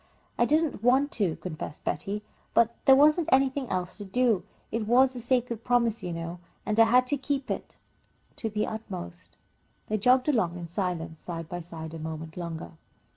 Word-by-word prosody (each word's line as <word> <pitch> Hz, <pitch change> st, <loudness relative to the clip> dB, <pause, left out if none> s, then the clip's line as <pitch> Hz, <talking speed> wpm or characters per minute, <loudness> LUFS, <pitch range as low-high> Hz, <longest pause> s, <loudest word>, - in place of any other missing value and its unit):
"I 240 Hz, -, +3 dB
didn't 305 Hz, -4 st, +1 dB
want 265 Hz, +5 st, +3 dB
to," 190 Hz, -7 st, 0 dB
confessed 155 Hz, -4 st, -7 dB
Betty, 200 Hz, +8 st, -2 dB, 0.3 s
"but 235 Hz, 0 st, +4 dB
there 270 Hz, -, +8 dB
wasn't 305 Hz, +4 st, +5 dB
anything 265 Hz, 0 st, +2 dB
else 180 Hz, +2 st, -3 dB
to -, -, -5 dB
do. 220 Hz, -2 st, +1 dB, 0.3 s
It 220 Hz, -1 st, -2 dB
was 255 Hz, +2 st, +5 dB
a 245 Hz, -, -5 dB
sacred 240 Hz, -2 st, 0 dB
promise, 235 Hz, -2 st, +2 dB
you 180 Hz, -, -4 dB
know, 165 Hz, +1 st, -5 dB, 0.3 s
and 215 Hz, +1 st, 0 dB
I 225 Hz, -, +9 dB
had 250 Hz, +2 st, +5 dB
to 285 Hz, +3 st, +1 dB
keep 275 Hz, 0 st, -2 dB
it -, -, -5 dB, 0.6 s
to 225 Hz, -, -2 dB
the 210 Hz, 0 st, -1 dB
utmost." 85 Hz, -, -7 dB, 0.5 s
They 215 Hz, 0 st, 0 dB
jogged 250 Hz, +5 st, +4 dB
along 220 Hz, -, +1 dB
in 175 Hz, -, -6 dB
silence 170 Hz, -3 st, -3 dB
side 165 Hz, -2 st, -6 dB
by 175 Hz, +1 st, -5 dB
side, 160 Hz, -1 st, -8 dB
a 165 Hz, -, -6 dB
moment 160 Hz, 0 st, -6 dB
longer. 170 Hz, -2 st, -5 dB
215 Hz, 180 wpm, -28 LUFS, 170-250 Hz, 0.6 s, I